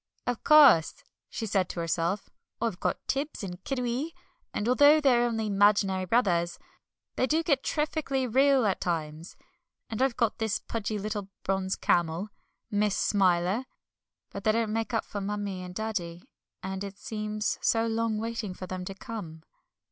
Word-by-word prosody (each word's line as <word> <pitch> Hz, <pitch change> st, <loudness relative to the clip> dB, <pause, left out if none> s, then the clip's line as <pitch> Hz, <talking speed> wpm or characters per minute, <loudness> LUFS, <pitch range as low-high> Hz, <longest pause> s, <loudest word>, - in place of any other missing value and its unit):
"Of 245 Hz, -2 st, -2 dB
course," 285 Hz, -, +7 dB, 0.3 s
she 225 Hz, -, -4 dB
said 195 Hz, -3 st, 0 dB
to -, -, -5 dB
herself, 170 Hz, +4 st, -1 dB, 0.3 s
"I've 225 Hz, -6 st, -2 dB
got -, -, -2 dB
Tibbs 280 Hz, -3 st, -2 dB
and 180 Hz, -1 st, -7 dB
Kiddiwee, 260 Hz, +4 st, -2 dB, 0.4 s
and 210 Hz, -, -2 dB
although 290 Hz, +5 st, +6 dB
they're 250 Hz, -5 st, +4 dB
only 225 Hz, -2 st, -2 dB
'maginary 200 Hz, -2 st, +3 dB
brothers, 175 Hz, -7 st, +2 dB, 0.6 s
they 255 Hz, -, +2 dB
do 315 Hz, +4 st, +2 dB
get 280 Hz, -5 st, +1 dB
terrifkly 300 Hz, -3 st, -1 dB
real 265 Hz, +1 st, +4 dB
at 195 Hz, -, 0 dB
times, 160 Hz, -1 st, -3 dB, 0.6 s
and 220 Hz, -, -3 dB
I've 265 Hz, -2 st, +1 dB
got 230 Hz, -2 st, 0 dB
this 220 Hz, -2 st, 0 dB
pudgy 220 Hz, -1 st, -4 dB
little 205 Hz, -1 st, -4 dB
bronze 190 Hz, 0 st, 0 dB
camel 175 Hz, +4 st, 0 dB, 0.4 s
Miss 205 Hz, -1 st, +1 dB
Smiler 190 Hz, +3 st, +2 dB, 0.7 s
but 200 Hz, -, -7 dB
they 215 Hz, -, +4 dB
don't 225 Hz, -1 st, 0 dB
make 225 Hz, 0 st, -1 dB
up 225 Hz, -, 0 dB
for 205 Hz, -, -5 dB
Mummie 200 Hz, -2 st, -3 dB
and 180 Hz, 0 st, -8 dB
Daddy, 180 Hz, -6 st, -4 dB, 0.4 s
and 190 Hz, +1 st, -4 dB
it 200 Hz, 0 st, -7 dB
seems 215 Hz, 0 st, -3 dB
so 225 Hz, 0 st, +2 dB
long 225 Hz, -1 st, 0 dB
waiting 225 Hz, -3 st, -4 dB
for 185 Hz, -, -7 dB
them 185 Hz, 0 st, -5 dB
to 195 Hz, -, -6 dB
come." 175 Hz, -7 st, -8 dB
210 Hz, 160 wpm, -28 LUFS, 190-235 Hz, 0.7 s, course